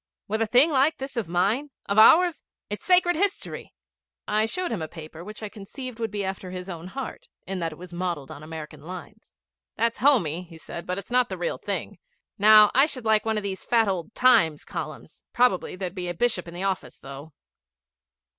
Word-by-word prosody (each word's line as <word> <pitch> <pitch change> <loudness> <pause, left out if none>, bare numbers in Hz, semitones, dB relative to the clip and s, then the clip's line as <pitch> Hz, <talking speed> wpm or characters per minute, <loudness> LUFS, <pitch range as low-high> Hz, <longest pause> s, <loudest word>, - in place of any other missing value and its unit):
'With 220 +2 -1
a 225 - +2
thing 255 +8 +5
like 290 +3 +3
this 270 0 -5
of 230 -6 -2
mine 200 - +1 0.2
of 200 +2 +3
ours? 335 +7 +6 0.3
It's 205 - -5
sacred 360 -1 +4
history!' 395 +4 -2 0.6
I 215 +1 +2
showed 365 +8 -2
him 210 -7 -2
a 160 - -3
paper 160 0 -10
which 210 +3 -9
I - - -2
conceived 225 +4 -8
would 225 -1 -1
be 205 -1 -3
after 190 -1 -5
his 180 +1 -6
own 170 0 -7
heart, 265 +8 -7 0.2
in 190 0 -4
that 165 -1 -2
it 155 - -11
was 180 0 -11
modelled 170 -6 -3
on 145 - -9
American 155 -1 -8
lines. 185 +6 -10 0.4
'That's 230 +1 0
homey,' 185 - +3
he 165 -1 -13
said, 170 +1 -8
'but 180 0 -2
it's 200 - -8
not 250 0 +3
the - - -4
real - - -2
thing. - - -4 0.4
Now, 215 0 +8
I 270 +4 +5
should 255 -6 -5
like 220 -1 +3
one 220 -1 +1
of 210 - -2
these 195 -1 -4
fat 230 -2 +3
old 190 +2 -3
Times 165 -12 +4
columns. - - -7
Probably 245 -9 +2
there'd 185 -1 -4
be 180 -2 -4
a 175 - -4
bishop 190 -3 0
in 170 - -9
the 180 - -4
office, 195 -2 -2
though.' 140 +3 -10
205 Hz, 210 wpm, -25 LUFS, 175-245 Hz, 0.6 s, Now